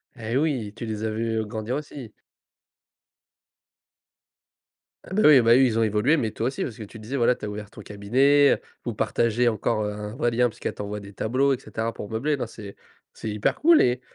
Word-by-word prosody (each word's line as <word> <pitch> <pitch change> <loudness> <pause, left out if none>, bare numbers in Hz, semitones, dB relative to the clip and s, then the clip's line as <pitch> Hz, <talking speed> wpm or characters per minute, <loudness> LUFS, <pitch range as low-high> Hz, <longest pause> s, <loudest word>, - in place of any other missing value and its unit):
Eh 115 +1 -3
oui, 130 -9 -1
tu 115 - -6
les 110 -1 -4
as 110 - 0
vus, 115 +1 -2
heu, 110 - -2
grandir 110 +3 -4
aussi. 140 -6 -7 2.9
Ah, - - -9
bah, 215 - +2
oui, 145 -4 +8
bah, 115 0 +5
eux, 130 - +6
ils 115 -2 0
ont 115 - +3
évolué, 110 +8 +2
mais 110 -8 -1
toi 115 - -2
aussi, 135 - -3
parce 115 - -6
que 110 - -7
tu 105 - -11
disais, 115 +6 -5
voilà, 120 +1 +3
tu - - -21
as 105 - -3
ouvert 105 0 -7
ton 105 - -12
cabinet, 130 +9 +3
heu, - - -4 0.2
vous 120 - -2
partagez 120 +2 +1
encore, 110 -1 -1
heu, 105 - -2
un 105 +1 -7
vrai 120 -2 0
lien, 125 +1 +3
parce 115 - -11
qu'elle - - -2
t'envoie 105 0 -5
des 100 - -11
tableaux 135 +7 +1
et 125 - -3
cetera 115 +1 -4
pour 105 - -8
meubler. 140 +7 -1
Non, 125 - -3
c'est 105 -3 -11 0.4
c'est 110 - -6
hyper 105 0 0
cool 330 +1 +6
et 125 0 +2
115 Hz, 225 wpm, -24 LUFS, 105-130 Hz, 2.9 s, oui